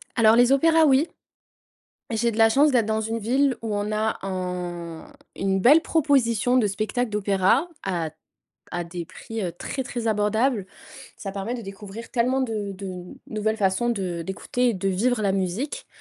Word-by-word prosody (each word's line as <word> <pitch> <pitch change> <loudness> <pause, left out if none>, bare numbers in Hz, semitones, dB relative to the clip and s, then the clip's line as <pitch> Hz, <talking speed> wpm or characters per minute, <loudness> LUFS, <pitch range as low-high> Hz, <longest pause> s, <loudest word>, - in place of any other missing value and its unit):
Alors 225 -2 +6
les 245 +2 +5
opéras, 320 +3 +5
oui. 280 +2 +4 1.0
J'ai 230 +1 +1
de 220 - -6
la 225 -1 +6
chance 285 +6 +4
d'être 240 -4 +3
dans 220 0 0
une 225 +1 -2
ville 255 +4 +1
où 220 -2 -2
on 205 +1 -2
a 215 +1 0
un 180 -3 -4 0.3
une 195 0 0
belle 285 +11 +6
proposition 255 -7 +2
de 225 -4 +3
spectacle 215 +5 -1
d'opéra 205 - +2 0.2
à 170 -4 -2 0.7
à 175 0 -2
des 170 0 -6
prix, 225 +6 -7
heu, 175 -3 -2
très, 265 +9 -4
très 245 -3 -5
abordables. 215 +1 +1 0.5
Ça 195 - -5
permet 200 +4 -4
de 245 - -5
découvrir 200 +2 -9
tellement 255 +2 +1
de 215 -5 -2
de 185 -2 -7 0.2
nouvelles 220 0 -1
façons 205 +4 +1
de 185 -6 -2
d'écouter 240 +7 -1
et - - -2
de 195 +1 -1
vivre 220 +5 +1
la 200 - +2
musique. 195 - -2
220 Hz, 170 wpm, -24 LUFS, 195-245 Hz, 1.0 s, Alors